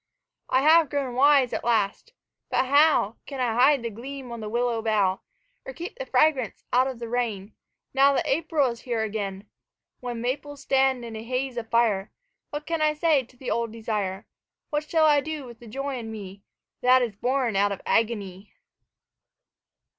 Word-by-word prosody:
I 260 +1 +3
have 320 0 +6
grown 275 -4 -2
wise 275 -1 +4
at - - -2
last 230 - 0 0.4
but - - +1
how 285 -5 +4
Can 275 -2 -6
I 245 -3 +1
hide 260 +2 +4
the 230 - -3
gleam 255 +3 -8
on 235 - -6
the 215 -1 -5
willow 235 0 0
bough, 205 -4 +1 0.4
Or - - -8
keep 345 +7 -7
the - - -6
fragrance 270 -8 +1
out 255 +2 +4
of 260 -2 -5
the 235 0 -6
rain 225 -4 -2 0.4
Now 275 +1 +5
that - - 0
April 300 -3 +1
is 235 - -10
here 235 -3 -2
again? 205 -2 -4 0.5
When 245 -2 -5
maples 280 +4 -4
stand 265 -2 +2
in 230 -1 -7
a 220 - -6
haze 255 +2 -2
of 230 -2 -5
fire 220 -5 +1 0.4
What 295 +1 -5
can 330 -1 -2
I 305 0 +2
say 305 -2 +3
to 250 0 -18
the 250 0 -5
old 230 -1 -1
desire, 210 -4 -3 0.5
What 300 0 -2
shall 320 -2 +3
I 295 -2 +5
do 310 -1 -5
with 235 -2 -12
the 240 - -13
joy 275 +3 -4
in 225 -1 -7
me 200 -2 -9 0.4
That 255 0 +5
is 225 -4 -3
born 250 0 0
out 200 +1 +3
of 200 - -4
agony? 205 -4 -1
245 Hz, 185 wpm, -25 LUFS, 225-280 Hz, 0.5 s, have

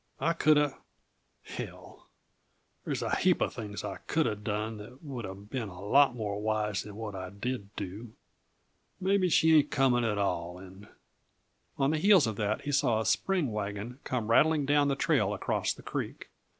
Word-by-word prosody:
I 165 - +2
coulda 150 -3 +3 0.6
hell, - - -9 0.8
there's - - -2
a - - 0
heap - - +3
uh - - +1
things 105 -3 -6
I - - -4
coulda 155 -9 +1
done 105 +1 -3
that 120 +7 -12
would 130 -8 -5
uh 95 - -7
been 105 +3 -5
a 90 -1 -11
lot 130 +6 +4
more 105 -3 -3
wise 105 -1 0
than 105 -1 -10
what 110 -1 -5
I 95 -1 -6
did 100 +1 -5
do! 105 +4 -6 0.9
Maybe 190 -1 +2
she 160 -1 +5
ain't 150 -1 +5
coming 130 -3 +2
at 110 -3 0
all, 90 -3 -1
and 95 +2 -12 0.4
" - - -44
On 135 +1 +2
the 155 - 0
heels 195 -3 +6
of 110 -2 -2
that 105 0 -1
he 145 - -3
saw 115 -5 +2
a 110 - -2
spring 175 - +1
wagon, 105 +4 -4
come 115 -3 -2
rattling 150 +3 +4
down 145 0 +3
the 140 - +1
trail - - +1
across - - -1
the - - -8
creek. - - -5
115 Hz, 180 wpm, -30 LUFS, 105-145 Hz, 0.9 s, heels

